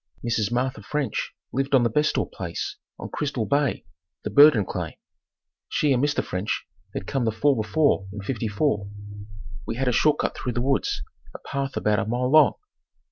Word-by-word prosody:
Mrs. 115 -2 0
Martha 125 -1 -1
French 145 +7 -2 0.2
lived 135 +1 +1
on 125 - +5
the 115 - +3
Bestor 150 +5 +2
place 85 -3 -5 0.2
on - - -7
Crystal 140 -6 -2
Bay, 140 0 0 0.4
the - - -3
Burdon 145 -8 +7
claim. - - -4 0.7
She 145 -2 +2
and 125 +1 +1
Mr. 145 0 +1
French 95 +3 -3 0.3
had - - -3
come 135 +3 -1
the 110 - +1
fall 140 +6 +2
before 110 -1 +1
in 100 0 -7
'54. 110 -1 -1 0.8
We 115 - -2
had 130 +2 -1
a - - +4
short 145 +5 +3
cut - - -1
through 125 - -3
the 120 - -1
woods, 135 - 0 0.3
a - - -6
path 135 0 -3
about 105 -1 +2
a - - -1
mile 125 +3 0
long. 155 -1 +7
125 Hz, 180 wpm, -25 LUFS, 110-140 Hz, 0.8 s, Burdon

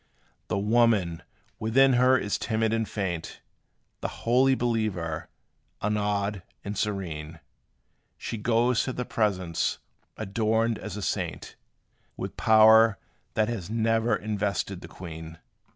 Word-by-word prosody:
The - - -1
woman 105 -5 +2 0.4
within 130 +5 +4
her 125 +1 +5
is 100 -4 -2
timid 110 -1 0
and 115 -1 -1
faint; 90 -5 -4 0.6
The - - -2 0.2
holy 130 +3 +4
believer, 110 -10 -2 0.5
unawed 105 -1 -1 0.2
and 100 +1 -4
serene; 85 -7 -3 0.8
She 115 - -5
goes 120 +2 +2
to 130 - -3
the 125 - -3
presence, 95 -8 0 0.4
adorned 110 +2 0
as 105 +1 -6
a 105 - -5
saint, - - -3 0.6
With - - -5
power 110 -1 +6 0.4
that 110 -1 +2
has 110 -6 -4
never 115 0 +2
invested 100 -3 -2
the - - -9
queen. 80 -2 -9
110 Hz, 120 wpm, -27 LUFS, 100-115 Hz, 0.8 s, power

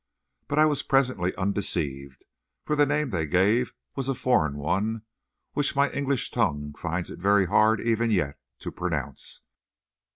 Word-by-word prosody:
But 145 - -2
I 155 - +6
was 150 -2 +1
presently 130 -10 +1
undeceived, 85 -9 -2 0.4
for 150 - -1
the 145 -1 +4
name 145 -2 0
they 80 -5 -1
gave 105 +10 +2 0.2
was 135 -1 -2
a 135 - 0
foreign 110 - +1
one, 100 +9 -1 0.5
which 145 -1 +1
my 140 0 +3
English 140 -2 -1
tongue 75 -11 -1
finds 85 +3 -4
it - - -9
very 100 +1 +4
hard 110 +4 +4
even 115 0 +1
yet 85 -10 0 0.2
to - - -5
pronounce. - - -4
105 Hz, 155 wpm, -26 LUFS, 85-135 Hz, 0.5 s, I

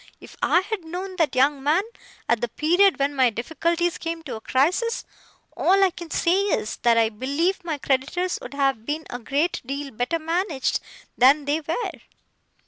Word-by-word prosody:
If - - -14
I 350 - +4
had 405 -1 -4
known 365 +3 -6
that 320 -5 +1
young 275 +2 +3
man, 310 +7 +2 0.4
at 235 -1 +2
the 240 - 0
period 350 - +3
when 280 0 0
my 260 -3 +4
difficulties 335 +9 -1
came 330 0 -4
to 275 - -6
a 220 - -8
crisis, 360 - +1 0.5
all 390 +2 +4
I 380 - +4
can 345 -1 -9
say 355 +4 +2
is, 360 - -1
that 235 -1 +3
I 225 -1 +4
believe 285 - -1
my 320 -3 -3
creditors 285 +7 -1
would - - -8
have 270 -5 +1
been 300 +5 -3
a 245 - -4
great 285 +8 -1
deal 275 +2 -5
better 245 +9 -1
managed 330 -3 -1 0.4
than 275 +4 +5
they 290 +2 +1
were. 325 +10 -2
305 Hz, 180 wpm, -24 LUFS, 265-350 Hz, 0.5 s, than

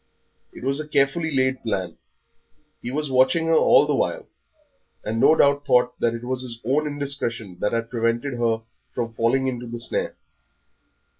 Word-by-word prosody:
It - - -12
was 135 +2 0
a 155 - -5
carefully 150 +3 +1
laid 130 -1 +1
plan, 95 -5 -3 0.9
he 120 - -5
was 145 +1 -3
watching 130 +6 +3
her 165 - +2
all - - +6
the - - 0
while, - - -1 0.8
and 110 +2 -2
no 155 - +6
doubt 140 -1 +3
thought 125 -2 +2
that 115 0 +1
it 115 - -7
was 130 +1 -2
his 120 -3 -7
own 150 +5 +1
indiscretion 135 -9 -3
that 105 - 0
had 115 0 -2
prevented 115 +3 0
her 115 -1 +1 0.3
from 115 -2 -3
falling 120 +4 +1
into 125 -2 -3
the 120 +1 -5
snare. 115 - -3
125 Hz, 170 wpm, -23 LUFS, 115-140 Hz, 0.9 s, all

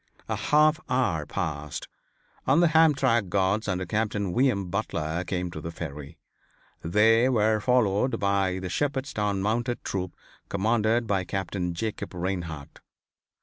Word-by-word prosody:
A - - -1
half 155 +1 +3
hour 100 - 0
passed 75 -6 -4 0.6
and 170 - +5
the 170 - +5
Hamtramck 135 - +3
guards 100 +3 +1
under 95 -1 -1
Captain 100 -1 -1
V. 130 +2 +4
M. 100 -6 -3
Butler 85 -4 -2
came 90 -1 -3
to 80 - -7
the 85 - -5
Ferry. 75 -1 -7 0.6
They 110 +8 +4
were 110 -3 +2
followed 125 0 +2
by 100 -2 +1
the 95 0 -4
Shepherdstown 110 - -1
Mounted 120 +3 -1
Troop 95 -2 -3 0.3
commanded 110 +3 +1
by 100 -3 0
Captain 90 -1 -3
Jacob 110 -1 -4
Reinhart. 85 -5 -4
100 Hz, 135 wpm, -26 LUFS, 90-115 Hz, 0.6 s, and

